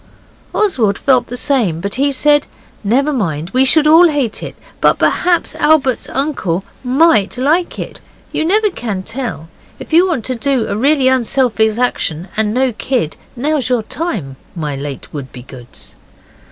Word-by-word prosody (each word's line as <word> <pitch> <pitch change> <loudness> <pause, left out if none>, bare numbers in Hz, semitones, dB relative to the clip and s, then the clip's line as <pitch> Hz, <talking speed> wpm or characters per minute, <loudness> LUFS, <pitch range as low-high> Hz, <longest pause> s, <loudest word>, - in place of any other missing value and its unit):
Oswald 245 - +1
felt 255 -4 +2
the 245 - -6
same, 230 - 0
but 200 +3 -4
he 280 +2 +1
said, 290 +1 +2 0.4
'Never 270 +8 +1
mind. 170 - -2
We 255 +1 +3
should 295 +3 +5
all 325 +3 +7
hate 275 -8 -2
it, - - -7 0.3
but - - +4
perhaps 350 -1 +1
Albert's 295 -4 +1
uncle 235 - -2 0.2
MIGHT 255 - +3
like 310 +7 +1
it. - - -7 0.3
You - - -2
can 315 - 0
never 360 - 0
tell. 230 - -5 0.3
If - - -10
you 350 +3 +5
want 295 - -2
to 260 - -1
do 255 -1 0
a - - -3
really 270 +4 +2
unselfish 235 -4 +1
action 185 -8 -1
and 215 -1 +1
no 255 +2 +1
kid, 230 - -2 0.2
now's 275 0 -1
your 245 -3 +1
time, 200 - -4 0.2
my 150 -4 -3
late 140 -1 -6
Wouldbegoods. 130 -3 -10
255 Hz, 155 wpm, -15 LUFS, 200-290 Hz, 0.4 s, all